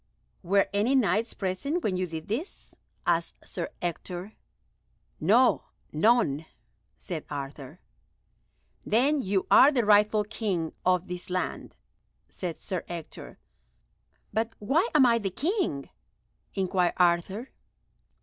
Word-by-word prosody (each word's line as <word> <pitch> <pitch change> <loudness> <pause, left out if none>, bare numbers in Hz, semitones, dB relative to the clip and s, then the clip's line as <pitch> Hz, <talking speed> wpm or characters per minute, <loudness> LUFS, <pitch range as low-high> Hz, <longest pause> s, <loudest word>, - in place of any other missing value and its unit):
"Were 195 +2 +2
any 215 +7 +2
Knights 225 -2 +1
present 230 - -2
when 190 - 0
you 185 0 -1
did 160 -1 -7
this?" 260 - -2 0.3
asked - - -1
Sir - - -4
Ector. 175 +3 -4 0.9
"No, 225 +10 +4 0.3
none," 160 - +2 0.5
said 170 -6 -5
Arthur. 140 +2 -7 1.0
"Then 275 +6 +2
you 195 -4 0
are 280 - +8
the 245 -6 +1
rightful 210 0 +5
King 200 -6 -2
of 180 0 +2
this 180 0 -6
land," 180 0 -3 0.5
said 175 -4 -5
Sir 185 -4 -4
Ector. 170 -2 -8 1.0
"But 225 +2 -1
why 300 - +1
am 280 -4 +7
I 230 -1 +4
the 200 -3 -2
King?" 280 - -2 0.6
inquired 185 -2 +1
Arthur. 180 +7 +1
195 Hz, 115 wpm, -28 LUFS, 175-230 Hz, 1.0 s, are